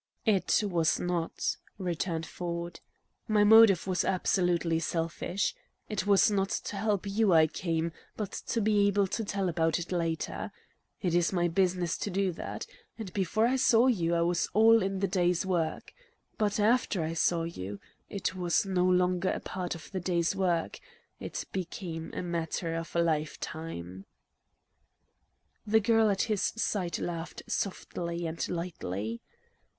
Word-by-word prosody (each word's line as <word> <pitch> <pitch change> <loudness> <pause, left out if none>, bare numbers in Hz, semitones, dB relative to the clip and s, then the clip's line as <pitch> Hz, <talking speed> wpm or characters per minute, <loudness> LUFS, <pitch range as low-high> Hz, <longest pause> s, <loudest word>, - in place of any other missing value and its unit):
"It 200 -2 +3
was 175 -5 +1
not," 175 -2 -1 0.2
returned 170 -3 -2
Ford. 170 0 -5 0.5
"My 215 -2 +4
motive 215 -3 +7
was 185 -1 0
absolutely 175 -3 +1
selfish. 170 +4 -1 0.4
It 205 -2 -2
was 200 +1 +5
not 195 -1 +1
to 205 - -3
help 205 -1 0
you 200 -1 +2
I 160 -1 +7
came, 165 +1 -2 0.3
but 210 -3 -3 0.2
to 230 - 0
be 205 -1 +3
able 200 0 +3
to 225 +4 -3
tell 200 -2 -1
about 165 -1 +1
it 175 +1 -6
later. 165 -2 -2 0.5
It 180 -3 +1
is 175 -1 +3
my 175 -2 +1
business 180 -1 0
to - - -2
do 195 0 0
that. 165 - -6 0.3
And 205 -5 -7
before 200 +3 +1
I 255 +3 +2
saw 240 -2 +5
you, 170 -10 +2
it 170 - +2
was 175 0 0
all 225 +1 +6
in 195 0 -2
the 195 - +2
day's 180 -1 +1
work. 170 -4 -2 0.4
But 210 -1 0
after 215 -4 +2
I 160 +1 -2
saw 165 +1 +1
you 100 - -6 0.3
it 195 -2 -2
was 180 0 +1
no 185 -2 +1
longer 180 0 +2
a - - -1
part 180 -2 -4
of 165 - -11
the 190 - -2
day's 175 0 0
work; 175 -4 0 0.4
it - - -5
became 170 -3 -5
a - - -3
matter 170 -1 -2
of 165 +1 -5
a 170 - +4
life 155 -2 -1
time." 95 - -7 1.6
The 220 +1 +5
girl 225 0 +3
at 195 -2 +1
his 215 -4 -1
side 195 -5 -1
laughed 170 -1 -5
softly 170 -3 -3
and 165 0 -3
lightly. 115 - -4
180 Hz, 155 wpm, -29 LUFS, 165-200 Hz, 1.6 s, motive